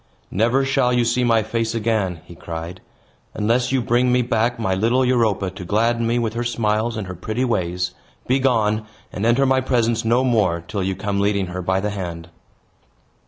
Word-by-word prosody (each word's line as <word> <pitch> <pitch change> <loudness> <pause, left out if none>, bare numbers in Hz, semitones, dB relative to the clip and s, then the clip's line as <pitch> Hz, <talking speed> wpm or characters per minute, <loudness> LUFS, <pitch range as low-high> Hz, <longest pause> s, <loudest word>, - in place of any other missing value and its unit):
"Never 120 +7 +2
shall 135 -2 +2
you 120 -1 +2
see 125 +2 +1
my 115 -2 +3
face 115 +1 -2
again," 105 -7 -1
he - - -12
cried, 85 +2 -7 0.5
"unless 120 +4 +1
you 130 -2 +1
bring 125 +2 +2
me 125 0 +3
back 120 0 0
my 110 -5 -1
little 115 +7 +2
Europa, 110 -6 +1
to 95 -1 -9
gladden 115 +5 +1
me 120 +1 +1
with 115 -2 -1
her 120 +1 -2
smiles 115 -1 0
and 105 - -3
her 95 - -6
pretty 110 +8 -2
ways. 90 -5 -1 0.3
Begone, 115 -5 +1 0.3
and 100 +4 -1
enter 125 +4 +3
my 130 0 +3
presence 120 -3 +1
no 120 +3 +2
more, 105 -9 +1
till 100 - -3
you 95 0 -1
come 100 +1 -2
leading 100 -1 +1
her 90 - -3
by 95 +1 0
the 105 +1 -2
hand." 85 -4 -6
115 Hz, 190 wpm, -21 LUFS, 95-120 Hz, 0.5 s, my